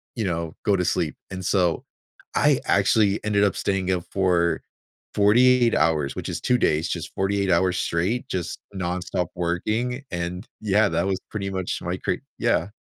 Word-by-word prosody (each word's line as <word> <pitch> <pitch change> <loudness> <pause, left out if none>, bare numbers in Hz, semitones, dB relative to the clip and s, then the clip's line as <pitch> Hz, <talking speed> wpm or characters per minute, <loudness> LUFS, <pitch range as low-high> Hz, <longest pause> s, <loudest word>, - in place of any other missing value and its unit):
you 115 - -2
know, 85 -3 -2
go 100 - +4
to 90 - 0
sleep, - - 0 0.2
and 95 -1 -5
so 90 -5 +1 0.5
I - - +4
actually 105 -2 +3
ended 100 -1 +2
up 100 -3 +2
staying 95 -2 0
up 90 -2 -1
for 90 -3 +2 0.5
48 120 +3 +5
hours, 75 -3 +1
which - - -5
is - - -3
2 125 - +2
days, 80 +2 +2
just - - -4
48 100 -1 0
hours 90 +1 +2
straight, 95 +9 -1
just 85 -2 -3 0.2
nonstop 90 0 -2
working, 110 +9 -1
and, 90 +2 -4 0.2
yeah, 105 0 +3
that 85 +1 0
was 95 -1 0
pretty 100 -2 -3
much 95 -2 -3
my - - -2
cra - - -1 0.2
yeah. 85 +4 +1
95 Hz, 170 wpm, -24 LUFS, 85-105 Hz, 0.5 s, 48